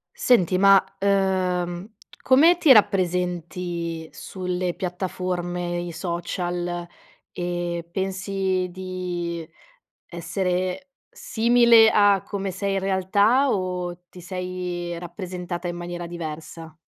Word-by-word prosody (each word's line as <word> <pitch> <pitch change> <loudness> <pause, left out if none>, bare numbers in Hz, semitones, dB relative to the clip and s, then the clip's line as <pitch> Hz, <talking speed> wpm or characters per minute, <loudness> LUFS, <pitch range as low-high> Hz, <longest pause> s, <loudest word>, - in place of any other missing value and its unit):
Senti, 185 -7 +3
ma 195 -1 +6
ehm, 185 -2 0 0.3
come 320 +7 +5
ti 305 -5 +7
rappresenti 175 -4 0
sulle 180 -1 -3
piattaforme, 180 -1 -3
i 175 0 -5
social, 175 +1 -3 0.5
e 175 -1 -3
pensi 190 0 -1
di 175 -2 -5 0.6
essere 180 - -2 0.2
simile 235 -1 +5
a 205 -2 +4
come 195 -1 -4
sei 195 +2 -2
in - - +1
realtà 200 +8 +2
o 180 -3 -2
ti 180 - -12
sei 180 -1 -4
rappresentata 175 0 -6
in 175 - -4
maniera 175 0 -5
diversa? 160 -1 -8
180 Hz, 95 wpm, -24 LUFS, 175-195 Hz, 0.6 s, ti